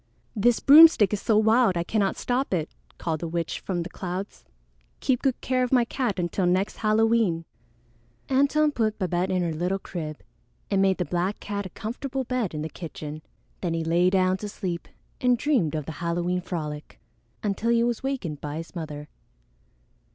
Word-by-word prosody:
"This 230 +2 +3
broomstick 285 - +8
is 205 - -1
so 220 - +2
wild 220 -3 +4
I 170 - 0
cannot 200 +1 0
stop 250 -4 0
it," 160 -3 -3 0.3
called 160 -2 -2
the 170 - -4
witch 165 0 -3
from 175 -3 -3
the 175 - -7
clouds. 185 +2 -6 0.5
"Keep 255 -2 +1
good 265 -3 0
care 255 0 0
of 250 - -2
my 250 -3 +4
cat 240 -5 -2
until 175 +1 0
next 185 +3 +1
Halloween." 215 -5 +2 0.8
Antone 280 +3 +3
put 220 -5 0
Babette 180 -1 -1
in 185 -1 +1
her 165 -2 -1
little 180 +5 -1
crib 155 -5 -6 0.5
and 195 -1 +3
made 195 -1 +3
the 180 - -1
black 180 +4 -1
cat 200 -1 -4
a - - -13
comfortable 260 +7 -4
bed 240 -9 -2
in 150 - -3
the - - -2
kitchen. 155 -2 -7 0.4
Then 170 -3 -1
he 165 - -1
lay 170 +2 +3
down 185 0 +2
to 210 +2 -6
sleep 185 -4 -4 0.3
and 250 -1 +3
dreamed 235 - +1
of 155 -2 -3
the 160 - -5
Halloween 175 +1 -1
frolic 150 -4 -6 0.4
until 210 +2 -1
he 235 0 +4
was 240 -1 -1
wakened 245 - -3
by 150 0 -4
his 165 +1 -7
mother. 150 -3 -6
190 Hz, 180 wpm, -26 LUFS, 170-235 Hz, 0.8 s, broomstick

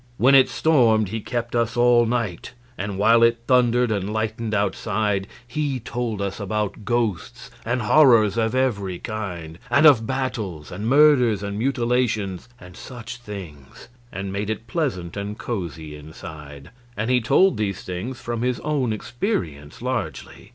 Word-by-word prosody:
When 130 +3 +4
it 135 -1 +6
stormed 115 - +3
he 110 +2 -4
kept 120 +2 -4
us 115 0 0
all 120 -1 +5
night; 115 -3 -3 0.2
and 100 -2 -4
while 115 +3 +5
it 115 0 +3
thundered 125 -1 +3
and 100 -1 -2
lightened 110 +1 -2
outside 105 0 -1 0.2
he 140 0 -2
told 115 -3 -3
us 100 +1 -4
about 105 0 -3
ghosts 115 -5 -2
and 120 +1 -1
horrors 115 -5 +5
of 115 +1 0
every 100 -9 0
kind, 90 -7 -6
and 140 +6 +4
of 125 -7 +6
battles 110 - -3
and 100 +5 -4
murders 130 -7 +5
and 100 0 -4
mutilations, 120 -6 -1
and 90 0 -13
such 120 0 -9
things, 90 - -10 0.2
and 95 0 -5
made 100 +1 -3
it 110 +1 -4
pleasant 115 - -3
and 100 +1 -5
cozy 85 -10 -5
inside; 75 -2 -11 0.3
and 110 +4 -1
he 125 -1 +3
told 185 - +3
these 100 -2 -2
things 100 +8 -5
from 120 -1 -4
his 125 0 0
own 140 -6 0
experience 90 - -4
largely. - - -4
110 Hz, 150 wpm, -23 LUFS, 100-120 Hz, 0.3 s, it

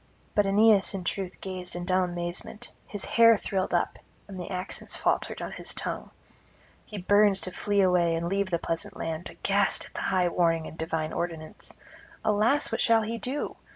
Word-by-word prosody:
But 205 -1 +3
Aeneas 205 0 +4
in 190 - -4
truth 190 0 -3
gazed 185 -2 -5
in 175 0 -4
dumb 185 0 +2
amazement, 175 +6 -5 0.2
his 205 - -5
hair 230 -1 +6
thrilled 190 -2 -2
up, - - 0 0.3
and 195 -2 -8
the 175 - -6
accents 185 -1 -4
faltered - - 0
on - - -5
his - - -3
tongue. - - -3 0.8
He 210 - -7
burns 205 +1 +4
to 185 - -1
flee 200 +2 +1
away 180 -3 +3
and 165 +1 -2
leave 195 +1 0
the 170 - +1
pleasant 165 0 -4
land, 165 +1 -4
aghast 200 0 +1
at - - -15
the - - -4
high 185 -2 +2
warning 165 -2 +1
and - - -8
divine 160 -1 -2
ordinance. 165 -2 -5 0.5
Alas, 215 +7 +2
what - - 0
shall 225 -2 +4
he 230 +2 -3
do? 265 +5 -3
185 Hz, 185 wpm, -28 LUFS, 175-205 Hz, 0.8 s, hair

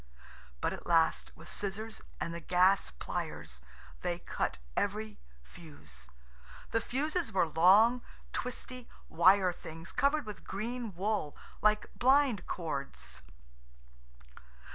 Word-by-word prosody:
But - - 0
at - - -9
last, 165 -2 +3
with 165 +1 -13
scissors 215 +2 -2 0.2
and 170 - -3
the 170 - -4
gas 185 +3 +3
pliers, - - -5 0.4
they 175 -1 -1
cut - - -3 0.2
every 210 +1 -2 0.2
fuse. 65 - -12 0.6
The 225 - +2
fuses 305 +9 -1
were 185 -3 +2
long, 200 +10 +5 0.3
twisty, 250 0 -5 0.2
wire 185 +2 +5
things 165 +1 -9
covered 290 0 +2
with 210 -2 -8
green 230 0 -4
wool, 195 -5 -1 0.2
like 215 0 +2
blind 260 -6 +3
cords. 140 - -5
195 Hz, 110 wpm, -32 LUFS, 170-230 Hz, 0.6 s, long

